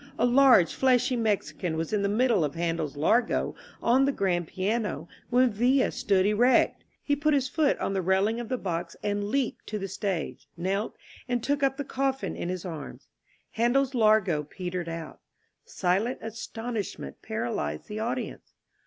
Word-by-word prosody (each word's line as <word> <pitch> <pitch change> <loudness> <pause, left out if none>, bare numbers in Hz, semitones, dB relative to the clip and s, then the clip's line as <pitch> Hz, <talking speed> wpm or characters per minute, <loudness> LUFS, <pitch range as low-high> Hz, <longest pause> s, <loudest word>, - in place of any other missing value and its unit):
A - - +3
large 245 -7 +6
fleshy 255 -1 +3
Mexican 205 -6 -1
was 165 +5 -3
in 210 - +2
the 200 - +1
mid 245 +5 +2
dle 205 -8 +3
of 145 -2 -2
Handel's 165 -3 -2
Largo" 225 +11 +2 0.3
on 260 +3 +4
the 280 - +2
grand 180 - 0
piano, 195 -4 -2 0.2
when 250 0 +4
Villa 250 +6 +2
stood 200 -6 +1
erect. 230 +5 +3 0.2
He 285 - +1
put 300 +1 +2
his 265 -2 +1
foot 300 +2 +1
on - - -2
the 190 - 0
railing 190 +5 +2
of 235 -1 -6
the 255 - 0
box 175 -5 -4
and 205 0 -1
leaped 250 +3 -2
to 215 - -3
the 195 -1 -4
stage, 165 -11 -3
knelt, 195 +5 -2 0.3
and 245 -2 0
took 285 0 0
up 270 -1 +1
the 285 - -2
coffin 270 0 -2
in 175 - -4
his 185 -1 -4
arms. 160 -5 -8 0.4
Handel's 255 +4 +2
"Largo" 215 -9 +3
petered 175 +3 -5
out. 165 -1 -7 0.5
Silent 195 +7 0
astonishment 225 - -5
paralyzed 75 +1 -3
the 210 +1 -5
audience. 245 +3 -4
215 Hz, 170 wpm, -27 LUFS, 180-250 Hz, 0.5 s, large